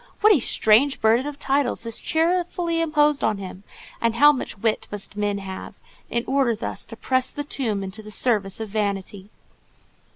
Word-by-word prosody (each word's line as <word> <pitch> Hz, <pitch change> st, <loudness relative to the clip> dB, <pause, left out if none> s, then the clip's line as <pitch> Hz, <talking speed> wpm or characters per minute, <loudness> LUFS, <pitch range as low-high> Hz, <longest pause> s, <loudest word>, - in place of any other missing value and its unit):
"What 430 Hz, 0 st, +7 dB
a 325 Hz, -, +3 dB
strange 235 Hz, +4 st, +3 dB
burden 230 Hz, +5 st, +3 dB
of 295 Hz, -1 st, -6 dB
titles 275 Hz, -4 st, 0 dB
is 230 Hz, -1 st, -3 dB
cheerfully 340 Hz, 0 st, 0 dB
imposed 300 Hz, -2 st, +2 dB
on 215 Hz, -2 st, +1 dB
him, 190 Hz, 0 st, -9 dB, 0.4 s
and 230 Hz, -1 st, +1 dB
how 290 Hz, +4 st, +7 dB
much 260 Hz, -5 st, -4 dB
wit 220 Hz, +2 st, -1 dB
must 205 Hz, -1 st, -5 dB
men 205 Hz, -1 st, -1 dB
have, 190 Hz, -1 st, -8 dB, 0.3 s
in 235 Hz, 0 st, -1 dB
order 265 Hz, -4 st, +1 dB
thus 215 Hz, -, -4 dB
to 225 Hz, -, -8 dB
press 260 Hz, +2 st, +1 dB
the 290 Hz, -, -3 dB
tomb 230 Hz, -9 st, -3 dB
into 195 Hz, +3 st, -6 dB
the 215 Hz, -, -11 dB
service 210 Hz, -3 st, 0 dB
of 220 Hz, -1 st, -5 dB
vanity!" 200 Hz, -1 st, -3 dB
230 Hz, 175 wpm, -23 LUFS, 205-285 Hz, 0.4 s, What